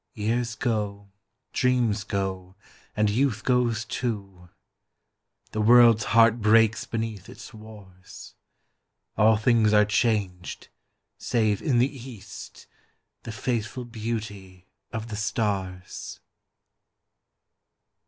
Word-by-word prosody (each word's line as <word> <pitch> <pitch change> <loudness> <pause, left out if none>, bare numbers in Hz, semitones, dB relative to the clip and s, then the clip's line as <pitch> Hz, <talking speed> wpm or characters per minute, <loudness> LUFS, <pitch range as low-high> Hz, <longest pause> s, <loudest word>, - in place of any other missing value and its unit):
Years 115 +2 -1
go, 105 -4 -3 0.4
dreams 120 -5 +1
go, 95 -2 -4 0.4
and 105 0 +3
youth 110 0 0
goes 120 -3 +1
too, 100 -8 -5 1.0
The 110 - -2
world's 115 0 +6
heart 115 0 +4
breaks 110 +2 +4
beneath 110 -5 -4
its - - -12
wars, 105 -4 -13 0.8
All 110 0 +4
things 110 -1 +3
are 105 0 +5
changed, 100 -4 -1 0.5
save 110 -4 0
in 135 -6 +1
the 130 +4 +2
east 105 -6 -11 0.6
The 115 - -7
faithful 120 +1 -3
beauty 105 -5 -6 0.3
of 115 0 -5
the 105 - -5
stars. 95 -4 -3
110 Hz, 95 wpm, -25 LUFS, 100-115 Hz, 1.0 s, world's